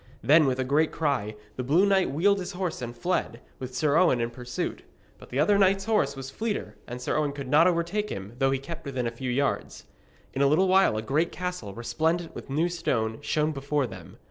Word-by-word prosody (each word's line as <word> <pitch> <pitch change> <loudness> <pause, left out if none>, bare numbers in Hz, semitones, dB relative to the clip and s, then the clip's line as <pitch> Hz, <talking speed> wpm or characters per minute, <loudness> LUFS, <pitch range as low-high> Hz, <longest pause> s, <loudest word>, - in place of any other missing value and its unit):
Then, 155 +1 +6
with 130 -1 +1
a 130 - 0
great 145 +4 +2
cry, 135 -9 -1 0.2
the 130 - -2
blue 160 +10 +4
knight 195 -2 +3
wheeled 195 +8 +2
his 185 +1 -5
horse 180 -5 -3
and 120 0 -6
fled, 150 -5 -1 0.2
with 130 -1 -7
Sir 145 +3 +2
Owen 165 -9 +4
in 115 0 -1
pursuit. 125 0 -4 0.4
But - - -14
the 125 - -4
other 200 +8 +4
knight's 195 0 +3
horse 205 -11 +1
was 135 0 -7
fleeter, 220 +6 -3
and 125 +1 -6
Sir 125 - -2
Owen 150 -2 0
could 140 -2 -6
not 155 +6 +5
overtake 180 +5 0
him, 100 +3 -6
though 135 - +3
he 135 - +1
kept 165 +4 -8
within 130 -3 -3
a 115 - -1
few 125 +2 -5
yards. 140 +3 -1 0.5
In 135 - -1
a 140 - +5
little 165 +7 +3
while 185 - +4
a 110 - -3
great 150 +8 0
castle, 180 - -5
resplendent 160 +8 -1
with - - -9
new 155 +5 +1
stone, 115 -10 -1
shone 155 0 0
before 140 0 -1
them. 95 -7 -10
145 Hz, 220 wpm, -27 LUFS, 125-175 Hz, 0.5 s, Then